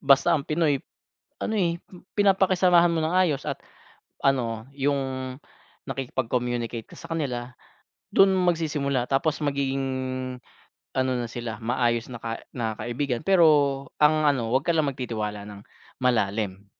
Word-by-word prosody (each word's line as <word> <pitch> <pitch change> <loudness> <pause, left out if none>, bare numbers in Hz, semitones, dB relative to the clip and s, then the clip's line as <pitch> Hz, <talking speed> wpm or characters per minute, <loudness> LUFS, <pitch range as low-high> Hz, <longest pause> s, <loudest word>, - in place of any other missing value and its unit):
basta 140 +5 +5
ang 145 -4 +1
Pinoy 150 -3 +1 0.6
ano, 220 - -2
eh, 170 -4 +1 0.4
pinapakisamahan 185 -3 +4
mo 165 - 0
ng 165 +3 -1
ayos 175 -7 +2
at - - -4 0.6
ano, 120 -3 0
yung 140 0 +1 0.9
nakkiipag-communicate 120 -3 -2
ka - - -17
sa - - -11
kanila, 125 -5 -3 0.6
dun 195 -1 +5
magsisimula. 150 -8 0
Tapos 145 +3 +1
magiging 140 -2 -1 1.1
ano 130 0 +2
na 120 -2 -2
sila, 115 -2 -5
maayos 120 0 0
na 120 - -6
ka 115 0 -5 0.2
na 115 -2 -1
kaibigan, 120 +3 -2
pero 185 -3 +5 0.6
ang 155 +1 +5
ano, 130 -6 +2
wag 130 +4 +2
ka 170 - +3
lang 155 -3 +2
magtitiwala 110 -5 -4
ng 100 -1 -9 0.4
malalim. 100 -4 0
135 Hz, 130 wpm, -26 LUFS, 120-160 Hz, 1.1 s, basta